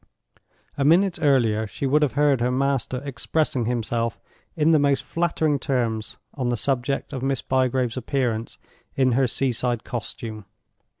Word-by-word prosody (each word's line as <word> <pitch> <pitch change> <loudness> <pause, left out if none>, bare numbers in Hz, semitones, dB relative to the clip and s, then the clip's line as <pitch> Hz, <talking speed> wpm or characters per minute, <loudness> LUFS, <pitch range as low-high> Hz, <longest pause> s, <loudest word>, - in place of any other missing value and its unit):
A - - +2
minute 175 +5 +4
earlier 115 -7 +2
she 105 - -5
would 145 +3 +3
have 145 -4 +1
heard 145 -3 +3
her 125 - +2
master 130 -1 -1
expressing 140 -2 -1
himself 115 -1 -1 0.4
in 160 0 +3
the 155 - +5
most 140 -1 +2
flattering 160 -4 0
terms 115 -5 -2 0.2
on 125 -3 -2
the 120 - 0
subject 135 +3 -1
of 130 - -4
Miss 135 -1 -1
Bygrave's 130 -2 0
appearance 120 -3 -2 0.4
in 130 -1 +3
her 130 +2 +3
sea 130 +2 0
side 120 0 -1
costume. 110 -2 -6
130 Hz, 155 wpm, -24 LUFS, 120-140 Hz, 0.4 s, the